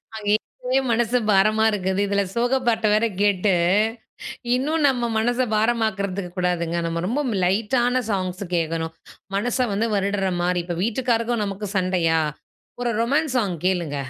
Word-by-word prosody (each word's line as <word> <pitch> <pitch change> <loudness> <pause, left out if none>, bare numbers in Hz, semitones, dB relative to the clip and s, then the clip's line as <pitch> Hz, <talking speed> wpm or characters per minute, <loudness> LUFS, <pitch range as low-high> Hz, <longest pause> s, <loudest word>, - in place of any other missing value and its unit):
அங்கே 205 -1 -2
ஏற்கனவே 255 +4 -2
மனசு 235 +1 +2
பாரமா 215 +3 +4
இருக்குது. 190 -2 -1
இதில 200 0 +1
சோக 245 +3 +2
பாட்ட 225 -1 +2
வேற 215 +2 +3 0.2
கேட்டு, 200 -1 +2 1.0
இன்னும் 300 +5 0
நம்ம 245 -3 0
மனச 240 +2 0 0.2
பாரமாக்குறதுக்கு 200 -5 0
கூடாதுங்க. 175 -2 0
நம்ம 165 0 -2
ரொம்ப 245 +9 0
ம் 215 - -1
லைட்டான 240 +6 +1
சாங்ஸ் 185 -1 -2
கேட்கணும். 165 0 -2 0.4
மனச 235 +5 -1
வந்து 215 +3 0
வருடுறமாரி. 190 -3 0
இப்ப 175 -1 -4
வீட்டுக்காருக்கும், 230 0 0
நமக்கும் 200 0 -5
சண்டையா? 180 -3 +2 0.6
ஒரு 240 - 0
ரொமான்ஸ் 280 +4 +1
சாங் 195 -7 -1
கேளுங்க. 175 -6 0
205 Hz, 135 wpm, -23 LUFS, 185-235 Hz, 1.0 s, பாரமா